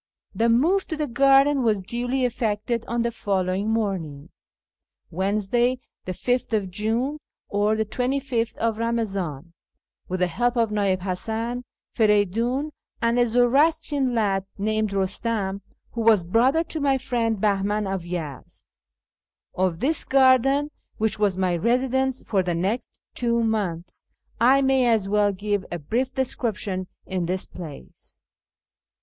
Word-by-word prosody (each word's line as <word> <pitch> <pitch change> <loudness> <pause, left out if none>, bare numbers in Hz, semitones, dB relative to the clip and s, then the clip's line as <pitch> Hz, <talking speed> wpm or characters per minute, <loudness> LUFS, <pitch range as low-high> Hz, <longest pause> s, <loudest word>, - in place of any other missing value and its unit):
The 230 +1 +1
move 330 +12 +3
to 320 - -4
the 305 - 0
garden 275 +2 +4
was 215 -5 +1
duly 245 +5 -1
effected 230 -1 -1
on 235 0 0
the 235 - 0
follow 190 -5 -1
ing 200 +3 -1
morning 190 -10 -2 0.8
(Wednesday, 210 +7 0 0.3
5th 215 0 -1
June, 230 +9 -1 0.3
Eamazan 215 +2 +2
25th) 230 - -1 0.6
with 185 0 -3
the - - +5
help 240 +8 0
of 230 -2 +2
Ni'i'ib 200 -3 +1
Hasan, 225 +6 -3 0.3
Feridiin, 225 +7 +1 0.3
and 235 +1 +1
a 240 - +4
Zoroastrian 270 +2 +2
lad 195 -3 0
named 215 +1 0
Eustam, 200 0 -1 0.3
who 235 - -3
was 220 -5 +5
brother 245 - +3
to 320 -1 -5
my 275 -2 +2
friend 235 -4 -1
Bahman 205 +1 +1
of 190 -1 -2
Yezd. 165 -6 -7 0.9
Of 180 -2 -1
this 310 +4 +2
garden, 270 +2 +4 0.3
which 215 -1 0
was 200 -3 +1
my 185 -2 +1
residence 255 +6 +1
for 195 -3 +1
the 175 -2 -1
next 195 +8 -2
two 235 -1 0
months, 185 -6 -2 0.3
I 265 +4 +5
may 265 -2 +3
as 220 -4 +2
well 205 0 +2
give 205 0 -2
a 175 - -2
brief 235 - -2
description 210 -7 -2 0.2
in 185 -3 -2
this 185 +1 -1
place. 155 - -11
220 Hz, 130 wpm, -24 LUFS, 195-250 Hz, 0.9 s, the